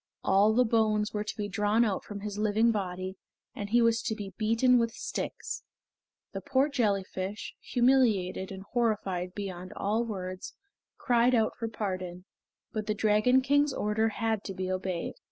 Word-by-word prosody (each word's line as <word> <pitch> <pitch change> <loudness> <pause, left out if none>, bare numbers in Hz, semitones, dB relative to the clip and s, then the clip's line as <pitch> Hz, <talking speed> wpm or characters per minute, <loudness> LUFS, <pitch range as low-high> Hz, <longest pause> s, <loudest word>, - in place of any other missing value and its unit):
All 200 +3 +4
the 250 +2 +4
bones 215 -2 +1
were 210 -1 -1
to 210 - -6
be 205 -1 -2
drawn 210 +3 +2
out 200 -4 -1
from 205 -1 -7
his 205 0 -5
living 215 +2 +3
body, 185 -2 -3 0.4
and 205 0 -5
he 240 +2 +4
was 230 0 +3
to 220 - -2
be 200 -3 -7
beaten 230 +3 +3
with 230 -1 0
sticks. - - -4 0.7
The - - -4
poor 275 +1 +2
jellyfish, 200 -5 -2
humiliated 230 -8 +2
and 190 0 -7
horrified 200 -6 -1
beyond 185 -3 -6
all 215 +4 0
words, 185 -5 -6 0.4
cried 245 0 +3
out 220 -2 +1
for 230 - -3
pardon. 185 -4 -4 0.5
But 215 -1 -3
the 215 - 0
Dragon 215 +5 +4
King's 285 +1 +3
order 215 +2 +1
had 220 -1 -1
to 195 - -5
be 185 0 -3
obeyed. 185 -2 -2
210 Hz, 165 wpm, -29 LUFS, 195-230 Hz, 0.7 s, All